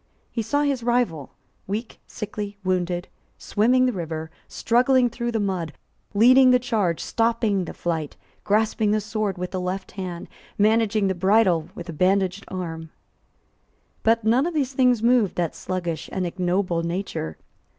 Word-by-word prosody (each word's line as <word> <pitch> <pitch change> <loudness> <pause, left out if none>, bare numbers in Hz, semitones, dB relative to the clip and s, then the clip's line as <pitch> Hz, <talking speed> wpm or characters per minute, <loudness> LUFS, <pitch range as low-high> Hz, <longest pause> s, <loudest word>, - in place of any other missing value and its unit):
He 230 - -2
saw 285 +7 0
his 280 -4 0
rival, 235 - -1 0.3
weak, 215 +4 -4
sickly, 205 -1 -6
wounded, 180 -1 -1 0.3
swimming 250 +5 +2
the 250 - +1
river, 160 -3 -5 0.2
struggling 245 +1 +2
through 235 +1 -3
the 225 - -1
mud, 185 -6 -2 0.4
leading 255 +5 +7
the 250 - +6
charge, 215 -9 0
stopping 225 -5 0
the - - -7
flight, 160 -4 -3 0.3
grasping 215 +1 +1
the 215 +1 +2
sword 210 -2 -2
with 180 0 -4
the 185 - -3
left 185 +1 -4
hand, 180 -3 -6 0.3
managing 215 0 +3
the 190 - +1
bridle 190 -3 +2
with 175 - -8
a 170 - -6
bandaged 190 +3 +1
arm. 165 -3 -5 1.1
But 230 0 +2
none 240 +8 +3
of 350 - -4
these 275 -3 0
things 250 -3 +3
moved 235 -5 +3
that 170 -3 -1
sluggish 175 -4 -4
and 185 -1 -2
ignoble 180 0 0
nature. 170 - -4
200 Hz, 150 wpm, -24 LUFS, 180-230 Hz, 1.1 s, leading